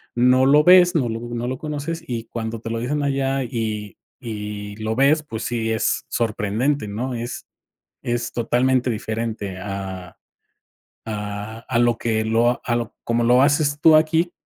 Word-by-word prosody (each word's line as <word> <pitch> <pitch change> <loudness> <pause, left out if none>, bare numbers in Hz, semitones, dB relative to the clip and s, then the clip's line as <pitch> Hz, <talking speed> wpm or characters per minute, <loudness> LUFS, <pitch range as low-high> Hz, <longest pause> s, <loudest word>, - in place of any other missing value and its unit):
no 125 +2 +4
lo 145 +2 +6
ves, 180 +1 +7
no 130 -7 +1
lo 115 0 -3
no 120 0 -4
lo 130 - -3
conoces, 155 +3 -4
y 115 -4 -3
cuando 115 0 -4
te 115 - -6
lo 115 0 -2
dicen 145 +5 -1
allá 135 -1 0
y 110 -5 -4 0.2
y 105 -3 -6
lo 110 0 -2
ves, 140 +5 +4
pues, 115 -7 -6
sí, 115 -2 -1
es 110 0 0
sorprendente, 115 +4 -1
¿no?, 120 +6 -3
es 120 +1 -5 0.6
es 120 0 -2
totalmente 125 +2 +1
diferente 110 -3 -4
a 95 -2 -6 0.9
a 105 0 -5
a 125 -3 +1
lo 120 -1 +3
que 110 -1 0
lo 115 +2 +2
a 120 - 0
lo 120 -1 -4
como 120 0 +1
lo 125 +2 +5
haces 145 0 +2
tú 160 0 +7
aquí 160 +3 +2
120 Hz, 165 wpm, -22 LUFS, 110-135 Hz, 0.9 s, ves